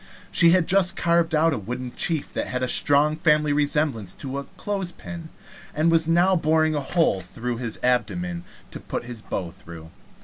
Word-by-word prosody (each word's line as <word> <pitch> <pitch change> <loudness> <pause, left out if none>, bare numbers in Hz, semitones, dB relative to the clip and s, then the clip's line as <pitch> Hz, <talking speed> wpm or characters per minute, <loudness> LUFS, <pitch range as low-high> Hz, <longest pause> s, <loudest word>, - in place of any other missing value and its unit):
She 170 - +5
had 180 0 +4
just 190 0 +4
carved 170 -1 +1
out 160 +1 +3
a 125 - -2
wooden 125 +4 -6
chief 160 -4 -1
that - - -3
had 125 0 -3
a - - +1
strong 145 +4 +2
family 150 -2 +2
resemblance 145 - 0
to 135 0 -5
a 140 - -7
clothes 195 -3 -3
pin, 170 -2 -9 0.5
and 155 +3 +2
was 165 -1 +2
now 175 +3 +3
boring 155 -1 +2
a 145 - -1
hole 160 - +1
through 115 +7 -5
his 115 -2 -3
abdomen 90 -9 -1 0.3
to - - -7
put - - -5
his 120 -2 -8
bow 90 -5 -4
through. 80 -1 -12
150 Hz, 190 wpm, -24 LUFS, 120-165 Hz, 0.5 s, She